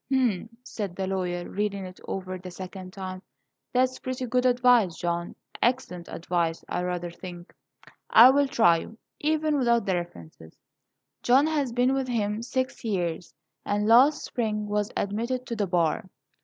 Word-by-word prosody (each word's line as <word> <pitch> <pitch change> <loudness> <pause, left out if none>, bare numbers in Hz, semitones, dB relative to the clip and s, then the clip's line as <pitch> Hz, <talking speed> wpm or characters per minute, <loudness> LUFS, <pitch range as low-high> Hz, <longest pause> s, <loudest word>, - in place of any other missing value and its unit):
"H'm!" 235 -6 +1
said 200 -7 -5
the 190 - -2
lawyer, 180 -2 -2
reading 200 -1 -2
it 185 0 -11
over 185 -1 -4
the 180 0 -8
second 185 +1 -8
time. 185 -1 -6 0.5
"That's 255 +1 +1
pretty 255 0 -4
good 250 +1 +2
advice, 245 -8 +4
John, 170 0 -2 0.3
excellent 230 -8 0
advice. 170 -1 -2
I 175 - -2
rather 180 -1 -3
think 175 0 -10 0.6
I 240 +3 +9
will 285 +1 +3
try 175 -10 +4
you, 220 +7 -8 0.2
even 310 0 +1
without 235 -4 +2
the 190 - +1
references." 85 - -7 0.6
John 260 +4 +4
has 295 -5 0
been 250 +2 +2
with 270 -1 -1
him 215 -3 -1
six 260 +2 -3
years, 175 -6 -2 0.3
and 205 +1 0
last 265 +7 +6
spring 215 -3 -2
was 210 0 -1
admitted 235 +5 -2
to 235 - -4
the 205 -3 -1
bar. 175 0 0
210 Hz, 155 wpm, -26 LUFS, 180-250 Hz, 0.6 s, I